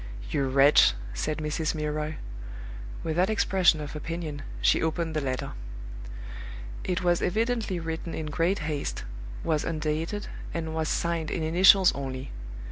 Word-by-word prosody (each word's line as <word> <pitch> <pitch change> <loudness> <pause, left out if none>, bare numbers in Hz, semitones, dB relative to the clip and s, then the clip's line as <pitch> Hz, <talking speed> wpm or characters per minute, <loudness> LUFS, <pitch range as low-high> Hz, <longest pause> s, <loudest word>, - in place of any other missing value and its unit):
"You 140 - +1
wretch!" 140 - +7 0.2
said 150 - -1
Mrs. 155 +1 -1
Milroy. 150 0 -2 0.9
With 160 0 -1
that 185 +3 +4
expression 190 -6 +4
of 150 0 -5
opinion, 155 -1 -4 0.2
she - - +4
opened 160 0 -1
the 155 - +1
letter. 130 -2 -2 1.3
It 180 0 -1
was 175 -1 +3
evidently 220 -2 +1
written 165 0 -4
in 160 - -3
great 165 +6 +1
haste, 150 -2 -2 0.4
was 155 -2 +1
undated, 160 +5 -1 0.3
and 160 -1 -2
was 160 0 0
signed 170 -2 0
in 165 - -1
initials 185 +4 +7
only. 135 -1 -5
160 Hz, 135 wpm, -28 LUFS, 150-175 Hz, 1.3 s, wretch